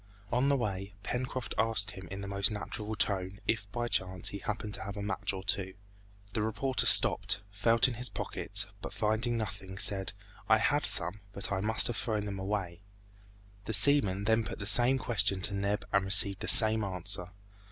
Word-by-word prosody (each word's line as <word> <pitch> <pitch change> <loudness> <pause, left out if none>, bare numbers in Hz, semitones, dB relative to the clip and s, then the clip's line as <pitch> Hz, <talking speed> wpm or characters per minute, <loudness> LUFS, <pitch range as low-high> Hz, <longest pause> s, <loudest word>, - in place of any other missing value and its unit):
On 125 +3 +1
the 140 - +2
way, 100 -4 -5
Pencroft 130 0 -4
asked 110 -2 0
him 95 -3 -11
in 100 +2 -7
the 100 - -7
most 100 0 +1
natural 105 0 -6
tone, 95 -1 -1
if 105 -3 -2
by 120 +1 -3
chance 95 -4 -2
he 100 - -7
happened 105 -1 -5
to - - -1
have 100 0 -7
a 100 - -5
match 100 -2 -1
or 95 -1 -7
two. 95 0 -2 0.6
The 110 - -1
reporter 110 +5 -1
stopped, 100 - +2
felt 115 +5 +4
in 130 - -3
his 120 +2 -1
pockets, - - -1 0.2
but - - -8
finding 115 +3 -1
nothing 100 -3 -7
said, 100 -2 +1 0.4
"I 110 - +5
had 145 +6 0
some, 90 +4 0
but 100 - -4
I 95 -1 -2
must 110 +2 +3
have 120 - 0
thrown 105 -3 -3
them 100 -2 -6
away." 95 -3 -4 0.8
The 110 - -4
seaman 105 -4 +5
then 110 +2 +1
put - - -7
the 100 - -6
same 120 +6 +7
question 100 -6 +1
to 100 - -1
Neb 100 +1 -2
and 100 -1 +2
received 95 0 +6
the - - -6
same 110 -1 +6
answer. 90 -2 -2
105 Hz, 195 wpm, -30 LUFS, 95-110 Hz, 0.8 s, same